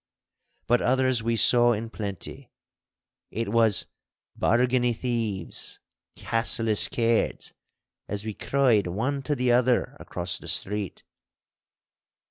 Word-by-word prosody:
But 120 +1 +2
others 130 -1 +2
we 115 +1 -1
saw 120 +2 +5
in 110 +1 -5
plenty. 100 -5 -7 0.8
It 115 -1 -4
was 115 -2 +2 0.5
'Bargany 125 +1 +1
thieves!' 115 -8 -2 0.4
'Cassillis 115 -1 +2
cairds!' 115 -1 -1 0.5
as 105 +1 -4
we 110 - -4
cried 120 -6 +1
one 125 +10 -2
to 145 +2 -2
the 125 -2 +1
other 125 0 +2
across 90 0 -3
the - - -12
street. 105 -1 -1
115 Hz, 105 wpm, -25 LUFS, 105-125 Hz, 0.8 s, saw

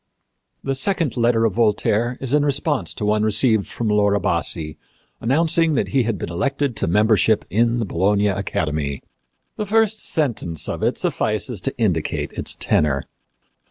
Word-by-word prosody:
The 135 - -1
second 165 +1 0
letter 115 -2 +2
of 110 - +1
Voltaire 115 +2 +1
is 135 0 -3
in 150 -1 +3
response 145 0 -1
to 105 - -3
one 105 0 +2
received 110 0 +2
from 115 - -4
Laura 105 -1 +2
Bassi 80 -3 -1 0.4
announcing 160 +5 +1
that - - 0
he 135 - +2
had 115 -3 -1
been 85 - -5
elected 140 +7 -1
to - - 0
membership 105 +3 +3
in 115 +3 +2
the 115 - -1
Bologna 100 +3 +1
Academy. 75 -7 -2 0.5
The 210 - -3
first 220 0 +2
sentence 115 - -1
of - - -4
it - - 0
suffices - - -2
to - - -2
indicate - - -1
its - - 0
tenor. 70 -3 +1
115 Hz, 160 wpm, -21 LUFS, 100-135 Hz, 0.5 s, in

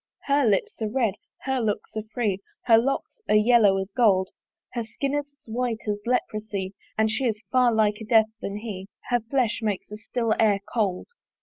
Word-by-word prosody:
Her 280 -2 +3
lips 205 +2 0
are 215 - 0
red, 230 -3 +1 0.3
her 265 0 0
looks 220 -2 -2
are 215 - -1
free, 210 -6 0 0.2
Her 225 -2 +6
locks 275 - -2
are - - +5
yellow 210 -2 +5
as 190 +1 -3
gold: 195 -4 +3 0.4
Her 240 -2 -2
skin 255 +5 -3
is 290 -1 -1
as 280 - -29
white 235 0 -2
as 205 0 -1
leprosy, 215 -5 -1 0.2
And 220 0 +3
she 260 +4 0
is 220 -3 0
far 250 -2 +4
liker 220 0 +1
Death 220 -2 +5
than 200 +1 -4
he; 205 -3 -6 0.2
Her 245 -1 +3
flesh 235 0 0
makes 210 -4 -2
the 210 - -7
still 225 +1 -1
air 210 -3 +4
cold. 200 -6 0
220 Hz, 190 wpm, -25 LUFS, 210-245 Hz, 0.4 s, Her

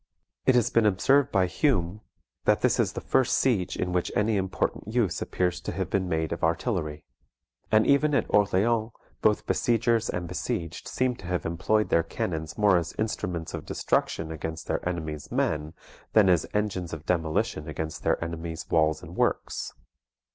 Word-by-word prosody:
It 130 - +6
has 120 -3 +3
been 115 -2 +4
observed 135 +8 +3
by 95 -2 +3
Hume, 95 - 0 0.4
that - - +3
this - - +2
is - - +1
the - - -5
first 130 - +2
siege 110 -9 +1
in 90 0 -2
which 90 -1 0
any 105 +1 +2
important 95 0 -2
use 110 -5 0
appears 90 -1 -1
to - - -4
have - - -3
been 95 -2 0
made 80 -1 -1
of 85 - -4
artillery. 80 -2 -1 0.7
And 110 0 +5
even 145 +1 +3
at - - +2
Orleans 110 +3 +2 0.3
both 105 -1 +2
besiegers 115 -1 +1
and 90 -1 -3
besieged 85 -1 -4
seem 130 -1 0
to 90 - -10
have 90 -1 -2
employed 105 +6 +1
their 85 - +4
cannons 80 -1 -4
more 105 -3 +5
as 85 0 -6
instruments 90 -6 -3
of - - -6
destruction 80 0 -1
against 80 +1 -5
their - - -2
enemy's 80 -4 -5
men, 75 +1 -1 0.4
than 105 -3 +6
as 90 -3 +3
engines 95 -5 -2
of 80 0 -7
demolition 80 -3 0
against 80 +1 -5
their - - +2
enemy's 85 0 -5
walls 80 -1 +2
and - - -10
works. - - -1
90 Hz, 170 wpm, -27 LUFS, 80-110 Hz, 0.7 s, It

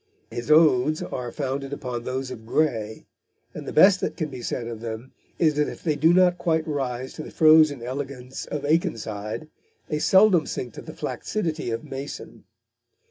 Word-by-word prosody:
His 120 +4 -5
odes 155 -2 +4
are 125 -2 -5
founded 135 0 -3
upon 125 -3 -4
those 130 +1 -4
of 115 -3 -8
Gray, 110 -4 -1 0.5
and - - -8
the - - -3
best 190 +4 +6
that - - -2
can 160 -3 -2
be 130 -3 -8
said 120 0 -3
of 115 -1 -6
them 115 +2 -6 0.3
is 160 -3 +3
that 150 - +2
if - - -10
they 155 -3 +1
do 160 +3 +4
not 180 0 +4
quite 160 -1 0
rise 130 -4 -3
to - - -7
the - - -8
frozen 155 -5 +5
elegance 130 0 -6
of 145 -1 -4
Akenside, 110 -5 -1 0.4
they 150 - -1
seldom 190 -2 +5
sink 120 -3 -5
to - - -8
the - - -10
flaccidity 165 - -3
of 115 0 -3
Mason. 135 +2 -8
140 Hz, 180 wpm, -24 LUFS, 120-155 Hz, 0.5 s, best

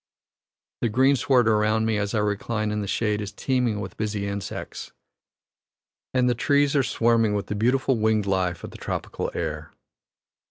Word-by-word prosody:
The 120 - +1
greensward 130 0 +3
around 110 0 +2
me 110 -2 +1
as 105 +1 -2
I 105 - +2
recline 105 +1 -1
in 105 0 -1
the 100 - -4
shade 105 0 0
is 105 - -5
teeming 125 -5 0
with 95 -3 -7
busy 105 -2 -2
insects, 100 0 -6 1.2
and 125 -1 +2
the 125 - +3
trees 140 +4 +2
are 140 - +5
swarming 115 -3 +2
with 100 - -2
the 105 - -4
beautiful 125 +3 +1
winged 110 -1 +2
life 95 -3 -1
of - - -7
the - - -12
tropical - - -3
air. 75 -2 -4
110 Hz, 165 wpm, -25 LUFS, 105-120 Hz, 1.2 s, are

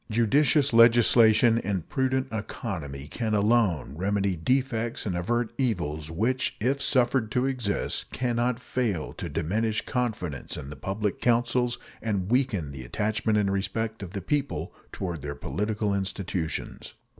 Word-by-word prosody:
Judicious 135 +5 +3
legislation 115 0 +6
and 95 -5 -3
prudent 130 0 0
economy 85 - -5
can 110 +6 -2
alone 105 - +2
remedy 100 +2 0
defects 120 +4 0
and 95 -4 -1
avert 115 +7 -1
evils 85 - -1
which, 115 +10 0
if 135 +5 0
suffered 125 -4 +2
to 125 +1 +2
exist, 125 -7 -2
can 120 -1 -1
not 120 0 +1
fail 110 -11 -2
to - - -6
diminish 105 +5 -1
confidence 110 - -3
in 70 - -7
the - - -7
public 100 +7 -3
councils 120 0 +2 0.2
and 100 -3 -2
weaken 120 - +1
the 65 -2 -7
attachment 105 - 0
and 100 -2 +2
respect 110 +3 -2
of 95 -2 -7
the 100 - -3
people 140 +3 -2 0.2
toward 85 -5 -4
their 70 +1 -5
political 105 +3 -2
institutions. 95 -4 -3
110 Hz, 140 wpm, -27 LUFS, 95-120 Hz, 0.2 s, legislation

